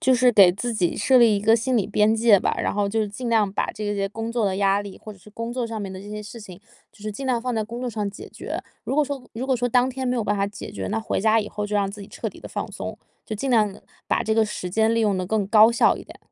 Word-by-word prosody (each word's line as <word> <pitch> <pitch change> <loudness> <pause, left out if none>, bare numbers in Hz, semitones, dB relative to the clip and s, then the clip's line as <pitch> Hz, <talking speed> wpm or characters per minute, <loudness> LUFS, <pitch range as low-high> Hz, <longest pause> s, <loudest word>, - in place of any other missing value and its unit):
就 260 - +3
是 250 0 +4
给 195 -5 +8
自 230 +6 -3
己 180 -5 0
设 265 - +3
立 230 -4 +6
一 - - -2
个 220 +2 +5
心 245 +3 +1
理 205 - +1
边 210 +1 +3
界 225 -3 +5
吧。 - - 0
然 - - -1
后 205 -1 +1
就 220 +1 0
尽 220 +5 -6
量 215 -3 +3
把 - - 0
这 215 - -6
些 195 -1 -1
工 225 +3 -5
作 235 -2 0
的 190 -2 0
压 200 0 +2
力， 200 -1 -10
或 215 - -10
者 195 - -17
是 210 - -17
工 230 +2 -5
作 250 0 -2
上 225 -1 -5
面 195 -2 -5
的 185 - -8
这 205 +1 -10
些 210 0 -5
事 215 +3 -9
情， 190 -3 -11 0.3
就 205 - -19
是 215 0 -4
尽 270 +6 -6
量 250 -3 +1
放 250 +1 -2
在 220 - 0
工 235 +3 -7
作 250 - -2
上 210 -3 -2
解 195 - -10
决。 - - -6 0.2
如 270 - -3
果 300 - +4
说 280 -2 -5
如 245 +4 -4
果 265 - +2
说 245 +1 0
当 250 +1 +3
天 260 0 -4
没 250 0 0
有 230 - -1
办 205 - 0
法 200 - +1
解 205 0 -7
决， - - -4
那 220 - -1
回 220 - -2
家 220 +2 +4
以 210 -1 -2
后 210 0 -4
就 210 0 -1
让 200 -1 +1
自 205 +1 -9
己 200 - -10
彻 - - -4
底 - - -14
地 - - -9
放 - - -4
松， - - -6 0.3
就 215 - -5
尽 270 +7 -3
量 215 -5 +3
地， 200 - -14 0.3
把 - - +1
这 220 - +1
个 225 0 +4
时 210 -3 -5
间 220 +4 +2
利 230 - +2
用 210 -3 +2
得 185 - -2
更 210 +1 0
高 220 +2 +7
效 235 - +3
一 - - -9
点。 - - -14
215 Hz, 350 characters per minute, -23 LUFS, 205-235 Hz, 0.3 s, 给